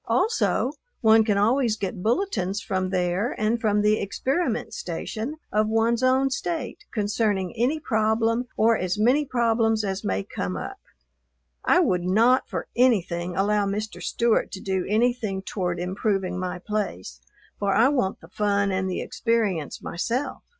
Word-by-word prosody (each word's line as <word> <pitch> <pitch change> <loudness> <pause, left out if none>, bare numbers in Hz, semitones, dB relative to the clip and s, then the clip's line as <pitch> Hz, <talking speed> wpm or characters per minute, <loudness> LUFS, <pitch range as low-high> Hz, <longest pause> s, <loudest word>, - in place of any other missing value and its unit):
Also 435 - +1 0.3
one 220 0 +6
can 210 -2 +1
always 230 +2 +2
get 195 -2 -4
bulletins 215 - 0
from 185 -2 -2
there 185 +4 -1
and 220 +2 +1
from 210 -2 +2
the 210 0 +3
Experiment 270 - -1
Station 285 - -4 0.2
of 215 +1 +2
one's 225 +2 +1
own 260 +1 +3
State 300 -1 -4
concerning 205 -3 0
any 250 +7 +1
problem 225 -1 +1
or 225 +1 +4
as 185 -1 -1
many 250 +8 +3
problems 225 -3 +1
as 195 -1 -3
may 95 +1 -1
come 90 -1 -4
up. - - -6 0.8
I - - +4
would 180 -1 +1
not, 225 +8 +3
for - - -3
anything, 180 -8 +1
allow 205 +1 +2
Mr. 200 -2 -4
Stewart 235 +5 +1
to 190 - -5
do 190 -1 -2
anything 220 -3 0
toward 180 -3 -2
improving 190 0 -1
my 180 -1 -3
place, 175 - -4 0.4
for 200 -1 +1
I 240 +4 +5
want 250 -10 -1
the 165 - -13
fun 200 0 +1
and 190 0 -1
the 180 - -2
experience 210 - -1
myself. 240 +10 -2
215 Hz, 150 wpm, -25 LUFS, 190-235 Hz, 0.8 s, one